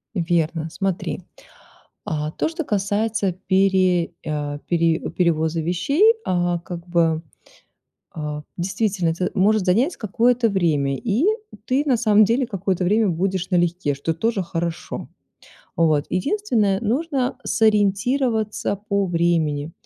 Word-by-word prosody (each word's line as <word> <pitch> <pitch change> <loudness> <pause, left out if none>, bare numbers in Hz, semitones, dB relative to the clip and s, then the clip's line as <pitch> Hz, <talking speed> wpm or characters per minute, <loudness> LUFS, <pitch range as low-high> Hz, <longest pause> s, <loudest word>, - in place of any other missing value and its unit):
Верно, 165 -2 0
смотри. 190 -2 -3 0.8
А, 155 -1 -2
то, - - -1
что 325 0 -4
касается 205 -2 0
пере 185 -1 +2 0.2
а, 145 -1 -3
пере 165 -2 +2
перевоза 165 -2 0
вещей, 275 - +3
а, 175 -1 0
как 175 0 -8
бы, 165 -2 +2 0.9
а, 150 -1 -5
действительно, 190 -1 0
это 180 +3 -2
может 205 +1 +2
занять 240 - +2
какое-то 230 +2 +2
время, 150 -8 +1
и 235 - 0 0.4
ты, 270 +2 +1
на 260 -5 +2
самом 215 -2 +5
деле, 240 +5 +1
какое-то 190 -3 -2
время 210 +4 +3
будешь 185 +2 -1
налегке, 175 -4 +1
что 150 +4 -2
тоже 200 +3 -1
хорошо. 170 0 -4 0.7
Вот, 155 -3 +3
единственное- 215 - +1
нужно 260 +3 -1
сориентироваться 220 +1 +1
по 200 -1 +1
времени. 165 -3 0
185 Hz, 120 wpm, -22 LUFS, 165-220 Hz, 0.9 s, самом